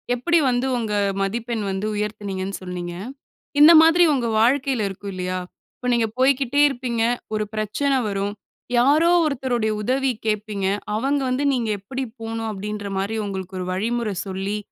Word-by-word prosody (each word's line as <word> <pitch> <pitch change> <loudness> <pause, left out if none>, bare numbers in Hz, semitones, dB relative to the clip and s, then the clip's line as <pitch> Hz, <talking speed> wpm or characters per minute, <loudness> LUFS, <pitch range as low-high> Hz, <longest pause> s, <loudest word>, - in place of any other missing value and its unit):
எப்பிடி 335 +7 +2
வந்து 250 +2 0
உங்க 220 -3 -2 0.3
மதிப்பெண் 225 +2 -2
வந்து 190 +2 -3
உயர்த்துனீங்கன்னு 200 -2 -3
சொன்னீங்க. 175 -1 -5 0.7
இந்த 305 +3 +10
மாதிரி 330 +2 +6
உங்க 245 -4 0
வாழ்க்கையில 255 -2 +2
இருக்கும் 200 +1 -7
இல்லயா! 185 0 -3 0.4
இப்ப 250 - -3
நீங்க 230 -2 +2
போய்க்கிட்டே 270 +1 +3
இருப்பீங்க, 240 -3 -2 0.3
ஒரு 215 - 0
பிரச்சனை 260 +6 0
வரும். 200 0 -2 0.4
யாரோ 300 +7 +4
ஒருத்தருடைய 245 -6 0
உதவி 265 +3 +1
கேட்பீங்க. 210 -2 -1 0.3
அவங்க 275 +5 0
வந்து, 260 +3 0
"நீங்க 235 -4 -1
எப்பிடி 260 +7 -5 0.2
போணும்?" 225 0 -3
அப்பிடீன்றமாரி 205 0 -4
உங்களுக்கு 190 -1 -5
ஒரு 180 - -3
வழிமுறை 220 +1 -1
சொல்லி, 195 +2 -3
225 Hz, 140 wpm, -22 LUFS, 200-260 Hz, 0.7 s, இந்த